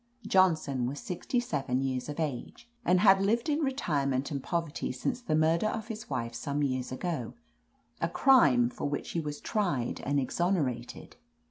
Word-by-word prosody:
Johnson 155 -9 +2
was 140 +3 -4
sixty 190 +7 -2
seven 135 - -1
years 130 0 -2
of 150 - -5
age, 150 - -4 0.2
and 180 +1 +3
had 195 -2 +6
lived 230 +8 +1
in 300 +1 +1
retirement 145 - 0
and 140 -2 -2
poverty 165 0 -2
since 240 - -3
the 160 -10 0
murder 160 +5 +3
of 220 +1 -4
his 220 -1 -7
wife 120 -4 -3
some 145 +4 -2
years 130 -2 -1
ago, 130 -3 -3 0.7
a - - +1
crime 135 - +5
for 145 - -3
which 145 - -4
he 170 - -1
was 150 -2 -4
tried 175 - -1
and 140 +1 +1
exonerated. 135 -5 -2
150 Hz, 165 wpm, -30 LUFS, 130-190 Hz, 0.7 s, had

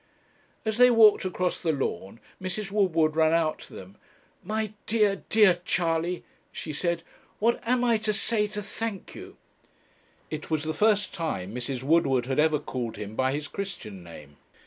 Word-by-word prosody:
As 220 0 -1
they 250 0 +8
walked 220 -5 +6
across 180 -1 -1
the 165 - 0
lawn 115 - -3 0.2
Mrs. 195 +2 -4
Woodward 165 -7 +2
ran 160 0 +4
out 165 -2 +1
to - - -13
them. 95 +2 -11 0.5
'My 215 +2 -2
dear, 210 -3 +2
dear 205 -5 +5
Charley,' 170 0 0 0.3
she 155 - -6
said, 170 +2 -1 0.3
'what 230 +3 +2
am 250 0 +2
I 235 -2 +3
to 215 0 -1
say 215 0 +1
to 210 0 -5
thank 205 0 -5
you?' - - -11 0.9
It 155 -1 -5
was 155 -2 0
the 155 0 -2
first 205 +2 +2
time 105 - -3
Mrs. 125 +1 -4
Woodward 135 -4 +3
had 135 +2 -1
ever 155 0 +4
called 125 -5 -5
him 105 +1 -7
by 130 +2 +1
his 145 +2 -3
Christian 175 - -6
name. 75 -4 -13
170 Hz, 170 wpm, -27 LUFS, 140-210 Hz, 0.9 s, they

